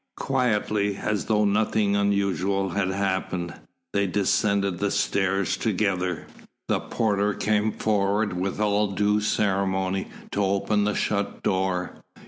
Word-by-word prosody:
Quietly, 105 -6 0
as 105 -1 -1
though 105 -1 +2
nothing 105 0 +2
unusual 100 -1 +1
had 95 +2 0
happened, 95 -3 -2 0.4
they 100 -1 +2
descended 100 -1 +1
the 100 0 +1
stairs 95 -1 +1
together. 95 -5 -1 0.4
The - - +2
porter 105 -2 0
came 110 0 +1
forward 105 -1 0
with 95 +3 -2
all 105 0 +2
due 105 +2 +2
ceremony, 95 -2 0 0.2
to 100 - 0
open 100 +2 +1
the 105 - 0
shut 100 -1 -1
door. 95 -1 -1
100 Hz, 120 wpm, -25 LUFS, 95-105 Hz, 0.4 s, though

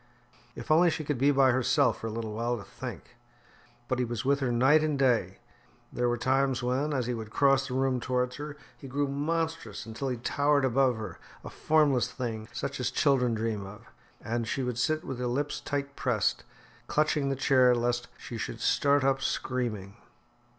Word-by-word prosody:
If - - -5
only 170 +3 +6
she 155 - -3
could 145 -4 -2
be 140 +2 +4
by 135 -2 +5
herself 130 +2 +2
for 115 - -3
a - - -4
little 110 -1 -4
while 120 +2 -1
to 100 - -8
think! 120 +2 -9 0.7
But 130 - -1
he - - +2
was 120 0 -4
with 140 +1 +3
her 130 -3 0
night 135 +6 +4
and 155 -2 0
day. 130 -4 +1 0.6
There 120 0 +1
were 120 - 0
times 130 +1 +1
when, 130 +5 0
as 130 -4 0
he 125 - -2
would 110 -2 -6
cross 135 +2 +3
the 125 - -4
room 130 -1 +1
towards 125 +1 -1
her, 150 0 -7 0.2
he 140 - -11
grew 140 +2 -1
monstrous 155 -5 -2
until 115 +5 -4
he 125 - -2
towered 140 +3 +1
above 130 -1 +2
her, 105 -6 -7 0.2
a - - -8
formless 140 -6 +2
thing 115 -4 -4
such 135 +3 -4
as 125 -5 0
children 125 -5 +2
dream 110 -2 -2
of. 105 +1 -13 0.3
And 115 +1 -2
she 135 - -2
would 125 -2 -3
sit 155 +3 0
with 130 -2 -5
her 125 - -1
lips 140 +4 -2
tight 140 0 -3
pressed, 120 -6 0 0.4
clutching 150 -2 +1
the 135 - 0
chair 130 -2 +4
lest 120 0 -1
she 115 - -7
should 115 - -5
start 140 +3 +2
up 135 0 +2
screaming. 115 -8 -3
130 Hz, 195 wpm, -29 LUFS, 120-140 Hz, 0.7 s, only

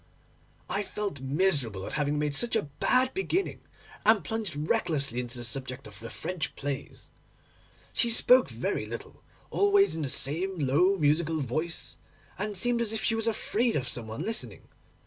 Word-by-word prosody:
I 200 - -1
felt 200 -8 -4
miserable 135 - +1
at - - -5
having 150 0 0
made 150 -1 0
such 235 +9 +4
a 220 - +2
bad 255 - +2
beginning, 385 0 -1 0.4
and 215 -5 +5
plunged 215 -1 -2
recklessly 150 - +1
into 125 0 -4
the 120 - -6
subject 125 +1 -6
of - - -11
the 115 0 -7
French 175 +2 -4
plays. 145 0 -5 0.8
She 235 - +4
spoke 250 +2 +5
very - - -2
little, - - -8 0.3
always 405 0 +4
in 160 - -3
the 140 - -2
same 175 +9 -1
low 160 +7 +3
musical 155 0 +2
voice, 155 +6 -3 0.4
and 210 0 -1
seemed 240 +3 +2
as 225 -2 0
if 220 - -2
she 225 - +2
was 225 0 0
afraid 225 +1 +1
of 130 -3 -1
some 115 -2 -1
one 110 +8 -5
listening. 225 +3 -4
170 Hz, 165 wpm, -29 LUFS, 140-225 Hz, 0.8 s, and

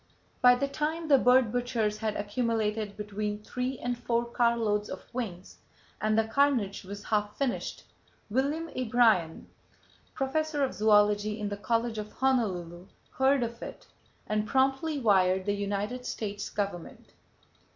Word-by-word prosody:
By 250 -1 +7
the 280 +3 -1
time 315 +3 -2
the 275 -2 +7
bird 250 -2 +4
butchers 230 -3 -1
had 215 -1 -2
accumulated 215 -1 -1
between 210 0 -4
three 250 +3 -3
and 245 +1 -2
four 235 0 -1
car 235 0 +2
loads 210 -2 0
of 185 - -7
wings, 195 -8 -6 0.4
and 215 0 +2
the 225 - +4
carnage 225 -4 +1
was 200 +2 -8
half 210 -1 -1
finished, 275 -3 -2 0.4
William 280 +8 0
A. 255 - -2
Bryan, 220 -9 +2 0.7
Professor 295 +2 0
of 265 - 0
Zoology 210 0 +3
in 210 -1 -2
the 205 - -3
College 230 +1 -1
of 210 0 -7
Honolulu, 185 -9 -1 0.2
heard 265 0 +3
of 235 +1 -5
it - - -8 0.4
and 215 0 -1
promptly 270 +4 +1
wired 190 -5 +3
the 205 - +1
United 205 +5 -3
States 205 -1 -4
Government. 200 -4 -5
220 Hz, 145 wpm, -29 LUFS, 205-255 Hz, 0.7 s, By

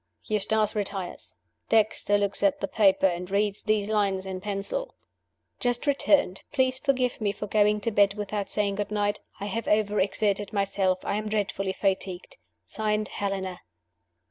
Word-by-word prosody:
Eustace 215 0 +1
retires. 195 -3 -3 0.3
Dexter 215 -2 +3
looks 200 -1 -1
at 295 -1 +3
the - - -2
paper, 195 -3 +3
and 180 0 0
reads 200 +1 0
these 215 -2 +1
lines 200 -3 +1
in 190 -1 -5
pencil: 210 - -3 0.6
'Just 245 +1 0
returned. 280 -8 +2
Please 260 -2 +1
forgive 255 -4 0
me 205 -2 +1
for 210 - -6
going 210 0 +3
to 230 - -1
bed 200 -1 +4
without 205 -1 -3
saying 205 -1 0
good 205 0 -3
night. 205 0 0 0.2
I 200 - -4
have 215 +3 -3
overexerted 205 -1 +1
myself; 195 -2 0
I 200 - 0
am 215 0 -3
dreadfully 195 -2 -1
fatigued. 195 - -2 0.3
(Signed) 215 -1 -1
Helena. 190 -2 -3
205 Hz, 150 wpm, -27 LUFS, 195-215 Hz, 0.6 s, bed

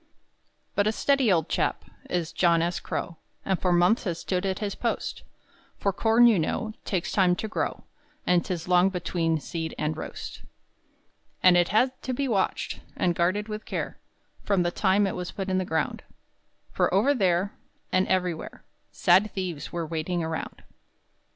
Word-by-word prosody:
But 205 0 +2
a - - +3
steady 270 0 +2
old 165 -4 +2
chap - - -1 0.2
Is 170 -3 -1
John 170 -2 +3
S. 175 +1 -1
Crow, 170 - -4 0.3
And 190 -2 0
for 180 - +2
months 175 +7 +3
has 170 -4 -1
stood 185 +2 -2
at 190 -1 -1
his 205 -2 -3
post; 235 - -3 0.6
For 200 - 0
corn 225 +4 +4
you 225 -6 +5
know 220 +7 -2
Takes 185 -4 -1
time 185 -3 +3
to 220 - -4
grow, 215 - -3 0.4
And 180 -1 +3
'tis 175 -2 -4
long 180 +1 +5
between 165 -3 -1
seed 160 +1 -5
and 155 +1 -1
roast. - - -7 1.0
And 185 -1 +7
it 175 0 +4
had 255 +6 +2
to 260 - -3
be 275 +2 -1
watched 205 -6 -1 0.2
And 175 - +1
guarded 185 +5 0
with 215 0 -5
care - - -4 0.4
From 195 -3 +1
the 175 - 0
time 195 +2 +3
it 195 - -2
was 180 -1 -4
put 195 -1 -4
in 185 0 +1
the 185 - -1
ground, 160 -2 -1 0.7
For - - +1
over 215 +10 +4
there, 190 -4 +1 0.4
And 185 0 +2
everywhere, 180 -3 -2 0.3
Sad 210 +3 +4
thieves 180 -6 -4
were 170 -1 -2
waiting 165 +2 -2
around. 160 0 -5
185 Hz, 170 wpm, -26 LUFS, 170-205 Hz, 1.0 s, And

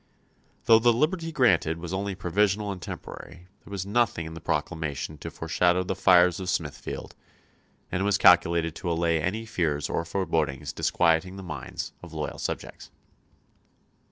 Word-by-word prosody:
Though 110 -1 +7
the 120 +1 +5
liberty 165 +7 0
granted 90 - +3
was 85 +1 -6
only 100 +1 -2
provisional 100 +3 0
and 95 -2 -7
temporary, 90 +1 -9
there - - -15
was 100 -2 -4
nothing 105 -5 +1
in 80 - -7
the 80 - -9
proclamation 75 -2 -3
to 80 - -6
foreshadow 90 +3 +1
the 90 - -2
fires 90 -1 +5
of 95 -1 -4
Smithfield, 75 -4 -4 0.8
and 90 - -1
it - - +1
was 100 -1 +3
calculated 85 -3 +5
to 90 -2 -4
allay 85 -1 +1
any 105 +8 -2
fears 80 -9 -1
or - - 0
forebodings 80 -6 -1
disquieting 90 +2 +1
the 95 - -8
minds 80 -5 -6
of 85 -2 -11
loyal 75 -1 -4
subjects. - - -5
90 Hz, 155 wpm, -26 LUFS, 80-100 Hz, 0.8 s, Though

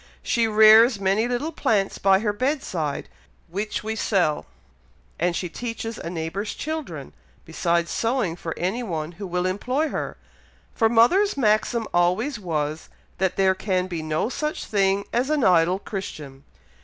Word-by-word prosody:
She 230 -1 +1
rears 220 +1 +7
many 200 +4 +1
little 250 +6 -2
plants 205 -10 0
by 195 0 +4
her 210 -2 0
bedside, 205 - -2 0.4
which 205 +5 -3
we 220 +1 -3
sell, 180 -8 0 0.7
and 175 +1 +1
she 180 - -2
teaches 230 +3 -5
a - - -5
neighbour's 175 +5 -4
children, 285 - -5 0.3
besides 170 +1 0
sewing 230 -7 0
for 165 -2 -6
any 190 +8 -1
one 165 -8 -4
who 190 +3 -8
will 180 0 -1
employ 250 +11 -1
her, - - -4 0.6
for 225 -2 +2
mother's 285 - +4
maxim 220 -1 +1
always 180 +9 +1
was, 155 -4 -3 0.3
that 190 -1 +1
there 190 -1 +3
can 185 -1 -1
be 175 -3 -4
no 155 +4 -1
such 300 +5 -3
thing 200 -1 +1
as 245 +4 +1
an 305 -3 +1
idle 180 -1 +4
Christian." 150 -9 -7
195 Hz, 150 wpm, -24 LUFS, 175-230 Hz, 0.7 s, rears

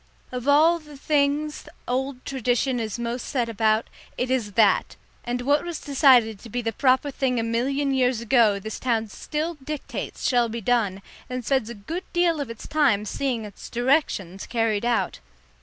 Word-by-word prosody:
Of 250 +1 -5
all 315 +4 +5
the 300 -2 -13
things 295 +1 0 0.2
old 260 +1 -2
Tradition 250 -1 0
is 220 -1 -3
most 235 +1 -3
set 245 -4 0
about, 220 0 +1 0.3
it 250 +1 -1
is 230 -6 -1
that; 210 -3 +3 0.3
and 245 +1 -2
what 285 +3 +2
was 345 -2 -4
decided 255 -7 +4
to 230 - -12
be 245 +2 -3
the 225 0 -1
proper 260 +4 +2
thing 255 -2 0
a - - 0
million 270 +5 0
years 255 -3 +2
ago 230 -3 +3
this 220 +2 -6
town 225 -3 0
still 310 - -4
dictates 300 0 -4
shall 240 -2 +3
be 230 +1 -4
done, 205 -4 0 0.3
and 250 -2 -4
spends 265 -4 +1
a 235 - -6
good 325 - -6
deal 345 -3 +2
of 275 - -4
its 230 -1 -8
time 265 -10 +2
seeing 245 -1 -2
its 205 -2 -10
directions 240 - 0
carried 225 -2 0
out. 240 -1 0
245 Hz, 175 wpm, -24 LUFS, 225-280 Hz, 0.3 s, all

